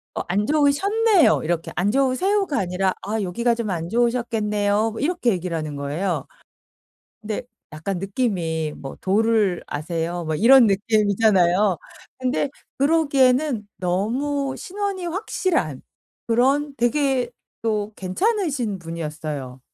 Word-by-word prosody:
"어 -, -, -1 dB
안 200 Hz, +4 st, 0 dB
좋으셨네요." 365 Hz, -, +3 dB
이렇게 165 Hz, 0 st, -2 dB
"안 190 Hz, +4 st, +2 dB
좋으세요."가 295 Hz, -, +1 dB
아니라 185 Hz, 0 st, 0 dB
"아 215 Hz, +2 st, -2 dB
여기가 235 Hz, +6 st, 0 dB
좀 230 Hz, -3 st, -3 dB
안 170 Hz, -2 st, -2 dB
좋으셨겠네요." 220 Hz, -2 st, +1 dB
뭐 225 Hz, -, -7 dB
이렇게 310 Hz, -4 st, +1 dB
얘기를 180 Hz, -2 st, -2 dB
하는 155 Hz, -2 st, -4 dB
거예요. 155 Hz, +7 st, -2 dB, 1.0 s
근데 215 Hz, 0 st, -3 dB, 0.3 s
약간 175 Hz, +4 st, -3 dB
느낌이 175 Hz, -7 st, -1 dB
뭐 135 Hz, -, -8 dB
"도를 210 Hz, -2 st, +2 dB
아세요?" 165 Hz, +3 st, -3 dB
뭐 160 Hz, 0 st, -2 dB
이런 245 Hz, -, +7 dB
느낌이잖아요. 205 Hz, -2 st, +3 dB, 0.4 s
근데 260 Hz, +2 st, 0 dB, 0.3 s
그러기에는 275 Hz, -5 st, +2 dB
너무 260 Hz, +10 st, -1 dB
신원이 390 Hz, -2 st, -4 dB
확실한 345 Hz, -, -1 dB, 0.5 s
그런 275 Hz, +5 st, +2 dB
되게 250 Hz, 0 st, +1 dB, 0.3 s
또 215 Hz, -1 st, -1 dB
괜찮으신 265 Hz, -, -1 dB
분이었어요. 155 Hz, -6 st, -6 dB
215 Hz, 285 characters per minute, -22 LUFS, 180-275 Hz, 1.0 s, 이런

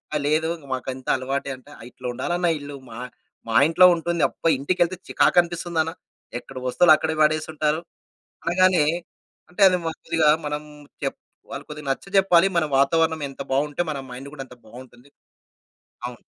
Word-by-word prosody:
ఆ! -, -, +3 dB
లేదు 155 Hz, +2 st, +1 dB, 0.2 s
మాకుంతా 130 Hz, 0 st, -5 dB
అలవాటే 135 Hz, +2 st, -3 dB
అంటే. 130 Hz, -, -17 dB, 0.2 s
"ఇట్లా 125 Hz, 0 st, -8 dB
ఉండాలన్న 175 Hz, +8 st, -1 dB
ఇల్లు 145 Hz, 0 st, -8 dB
మా 115 Hz, +1 st, -9 dB, 0.5 s
మా 115 Hz, -, -2 dB
ఇంట్లో 180 Hz, +2 st, +6 dB
ఉంటుంది. 170 Hz, 0 st, -2 dB
అబ్బా! 165 Hz, -, -1 dB
ఇంటికెళ్తే 175 Hz, +4 st, 0 dB
చికాకనిపిస్తుందన. 170 Hz, -2 st, +2 dB, 0.5 s
ఎక్కడ 130 Hz, +1 st, -12 dB
వస్తువులు 155 Hz, +6 st, +6 dB
అక్కడే 160 Hz, 0 st, -2 dB
వాడేసుంటారు" 155 Hz, 0 st, +1 dB, 0.7 s
అనగానే. 180 Hz, -1 st, +4 dB, 0.7 s
అంటే 180 Hz, -, -9 dB
అది 185 Hz, -, +2 dB
మ -, -, 0 dB
కొద్దిగా 155 Hz, -2 st, +2 dB, 0.2 s
మనం 150 Hz, 0 st, -3 dB, 0.4 s
చెప్ 135 Hz, -, -2 dB, 0.4 s
వాళ్ళకి 140 Hz, +2 st, -7 dB
కొద్దిగా 150 Hz, -1 st, -8 dB
నచ్చజెప్పాలి. 195 Hz, +3 st, +3 dB
మన 165 Hz, -, +2 dB
వాతావరణం 160 Hz, +3 st, +2 dB
ఎంత 135 Hz, -, -14 dB
బావుంటే 145 Hz, +5 st, 0 dB
మన 145 Hz, -, -3 dB
మైండ్ 135 Hz, +3 st, -8 dB
గూడా 135 Hz, -3 st, -7 dB
అంత 125 Hz, -, -14 dB
బావుంటుంది. 120 Hz, +3 st, -14 dB, 1.0 s
అవును. -, -, -11 dB
155 Hz, 145 wpm, -23 LUFS, 135-170 Hz, 1.0 s, ఇంట్లో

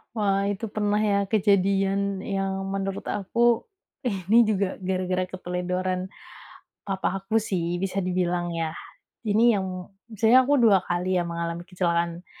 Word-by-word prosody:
Wah 200 Hz, -2 st, +1 dB
itu 205 Hz, +2 st, -3 dB
pernah 210 Hz, 0 st, 0 dB
ya 205 Hz, -2 st, +2 dB
kejadian 195 Hz, -1 st, +1 dB
yang 195 Hz, -1 st, -2 dB
menurut 195 Hz, 0 st, -3 dB
aku, 235 Hz, +4 st, +1 dB, 0.6 s
ini 230 Hz, +2 st, +7 dB
juga 200 Hz, -3 st, 0 dB
gara-gara 185 Hz, -1 st, -1 dB
keteledoran 180 Hz, 0 st, -3 dB, 0.8 s
papa 195 Hz, -1 st, -2 dB
aku 220 Hz, +3 st, +1 dB
sih, 175 Hz, -5 st, -2 dB
bisa 195 Hz, +1 st, -2 dB
dibilang 180 Hz, -1 st, -1 dB
ya. 165 Hz, -1 st, -3 dB, 0.5 s
Ini 220 Hz, +1 st, +2 dB
yang 195 Hz, -2 st, -1 dB, 0.4 s
misalnya 225 Hz, +4 st, +5 dB
aku 285 Hz, +2 st, +2 dB
2 210 Hz, -6 st, +5 dB
kali 180 Hz, +1 st, -1 dB
ya -, -, +1 dB
mengalami 170 Hz, 0 st, -4 dB
kecelakaan 170 Hz, -1 st, -1 dB
195 Hz, 130 wpm, -25 LUFS, 180-205 Hz, 0.8 s, ini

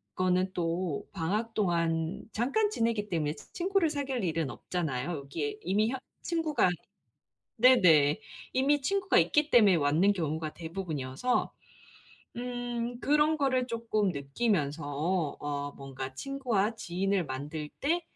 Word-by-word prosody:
거는 185 Hz, +1 st, +1 dB
또 170 Hz, -2 st, -2 dB
방학 210 Hz, +6 st, -1 dB
동안 170 Hz, 0 st, 0 dB
잠깐 345 Hz, -, +1 dB
지내기 230 Hz, -, 0 dB
때문에 155 Hz, -4 st, 0 dB, 0.2 s
친구를 370 Hz, -2 st, +1 dB
사귈 275 Hz, -5 st, -2 dB
일은 165 Hz, -4 st, 0 dB
없잖아요. 160 Hz, -4 st, -3 dB
여기에 145 Hz, +1 st, -4 dB
이미 210 Hz, +5 st, +2 dB
혀 265 Hz, -, -2 dB, 0.3 s
친구가 325 Hz, -, +1 dB, 0.9 s
네네 180 Hz, -, +6 dB, 0.3 s
이미 280 Hz, +3 st, +3 dB
친구가 390 Hz, +5 st, +1 dB
있기 300 Hz, 0 st, +3 dB
때문에 205 Hz, -7 st, +6 dB
왔는 160 Hz, +7 st, +3 dB
경우가 160 Hz, -3 st, -2 dB
대부분이어서 165 Hz, -, -2 dB, 0.9 s
음 245 Hz, -1 st, -3 dB
그런 300 Hz, +2 st, +3 dB
거를 260 Hz, -3 st, +1 dB
쪼끔 225 Hz, -4 st, 0 dB
느끼면서 145 Hz, 0 st, -1 dB, 0.6 s
어 145 Hz, -1 st, -3 dB
뭔가 135 Hz, -1 st, -7 dB
친구와 235 Hz, -, -1 dB
지인을 190 Hz, -2 st, -1 dB
만들 150 Hz, +3 st, -5 dB
때 340 Hz, +5 st, +1 dB
195 Hz, 270 characters per minute, -30 LUFS, 155-250 Hz, 0.9 s, 네네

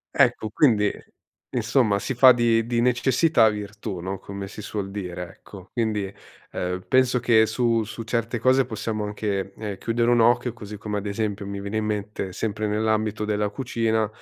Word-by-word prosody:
Ecco, 110 Hz, -, +3 dB
quindi 105 Hz, -6 st, +3 dB, 0.6 s
insomma 115 Hz, -2 st, +2 dB
si 120 Hz, +5 st, -3 dB
fa 130 Hz, +1 st, +8 dB
di 115 Hz, -1 st, +2 dB
di 120 Hz, -1 st, +1 dB
necessità 125 Hz, 0 st, +3 dB
virtù, 105 Hz, -2 st, -5 dB
no, 95 Hz, +2 st, -4 dB
come 100 Hz, 0 st, -7 dB
si 105 Hz, -, -9 dB
suol 100 Hz, -2 st, -4 dB
dire, 90 Hz, -3 st, -5 dB
ecco. 95 Hz, +2 st, -14 dB
Quindi, 105 Hz, -4 st, -1 dB, 0.4 s
ehm, 90 Hz, 0 st, -3 dB
penso 130 Hz, -1 st, +3 dB
che 110 Hz, -2 st, +4 dB
su 115 Hz, 0 st, +1 dB
su 110 Hz, +2 st, -7 dB
certe 115 Hz, +1 st, -1 dB
cose 130 Hz, +3 st, +3 dB
possiamo 110 Hz, -2 st, -3 dB
anche, 100 Hz, -2 st, -3 dB
ehm, 105 Hz, -3 st, -5 dB
chiudere 120 Hz, +1 st, +1 dB
un 120 Hz, -, +4 dB
occhio. 120 Hz, +1 st, +3 dB
Così 105 Hz, -2 st, -9 dB
come, 105 Hz, 0 st, -3 dB
ad 100 Hz, -, -6 dB
esempio, 100 Hz, -1 st, -3 dB
mi 100 Hz, 0 st, -5 dB
viene 100 Hz, +2 st, -3 dB
in 110 Hz, -, -1 dB
mente 105 Hz, -2 st, -3 dB
sempre 105 Hz, +2 st, -2 dB
nell'ambito 110 Hz, 0 st, 0 dB
della 105 Hz, -1 st, 0 dB
cucina, 110 Hz, -2 st, 0 dB
110 Hz, 175 wpm, -24 LUFS, 100-115 Hz, 0.6 s, fa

